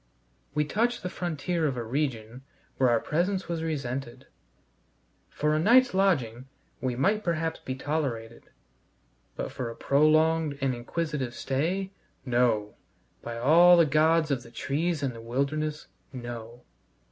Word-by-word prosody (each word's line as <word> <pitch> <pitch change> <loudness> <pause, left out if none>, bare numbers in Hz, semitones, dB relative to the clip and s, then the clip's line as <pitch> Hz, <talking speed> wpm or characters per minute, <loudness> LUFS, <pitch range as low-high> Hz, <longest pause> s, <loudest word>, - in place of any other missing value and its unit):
We 150 0 +2
touched 235 +9 0
the 180 - -3
frontier 170 -1 -1
of 135 -3 -2
a 120 - -2
region 120 -2 -3 0.4
where 130 -2 +3
our 120 -1 +3
presence 185 - -1
was 170 -1 -3
resented. 135 -6 -4 1.0
For 150 +1 0
a 155 - +2
night's 245 +7 +5
lodging 135 - +1 0.3
we 125 -2 -1
might 205 - +1
perhaps 165 -2 -1
be 130 - -5
tolerated; 130 -6 -4 0.9
but - - -4
for 125 -2 -4
a 115 - -8
prolonged 155 +1 +3
and 135 -2 0
inquisitive 130 0 -3
stay 180 +8 -1 0.3
No! 120 -4 +1 0.5
by 115 0 -6
all 170 +8 +6
the 170 - +6
gods 155 +1 +3
of 130 -3 0
the 120 - -14
trees 150 +6 -2
and 130 -3 -1
the 115 - -10
wilderness, 145 +6 -2 0.3
no! 120 -2 -8
145 Hz, 140 wpm, -27 LUFS, 120-165 Hz, 1.0 s, all